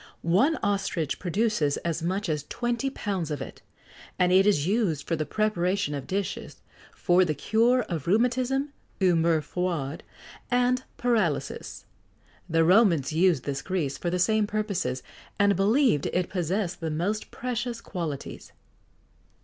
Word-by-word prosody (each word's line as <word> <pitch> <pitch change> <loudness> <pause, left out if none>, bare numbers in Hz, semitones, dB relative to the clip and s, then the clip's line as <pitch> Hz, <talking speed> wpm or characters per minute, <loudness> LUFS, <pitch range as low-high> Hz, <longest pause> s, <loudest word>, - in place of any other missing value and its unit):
One 205 - +3
ostrich 195 -7 -1
produces 185 -5 0
as 165 -1 -1
much 190 +5 -1
as 150 -3 -2
twenty 240 +2 -1
pounds 195 - -3
of 150 - -3
it, - - -8 0.6
and 180 0 +3
it 190 +2 +5
is 150 -8 +3
used 185 - 0
for 165 - +1
the 155 -2 -3
preparation 200 -4 0
of 140 -2 -5
dishes, 195 0 -4 0.3
for 180 +1 +3
the 155 -4 -1
cure 235 - +2
of 165 -7 -5
rheumatism, 255 +7 +1 0.3
humeurs 165 -4 +3
froides, 165 -5 -2 0.5
and 250 +1 +2
paralysis. 215 - -1 0.6
The 165 0 +3
Romans 175 - +4
used 165 -5 +3
this 140 -1 -3
grease 170 -8 -2
for 175 - -1
the 180 - 0
same 215 +4 +2
purposes, 200 - -2 0.3
and 200 -1 +4
believed 210 - +3
it 180 -1 -1
possessed 180 +1 -2
the 165 -2 -3
most 180 +8 -2
precious 240 -1 -3
qualities. 165 -10 -6
185 Hz, 140 wpm, -27 LUFS, 165-220 Hz, 0.6 s, it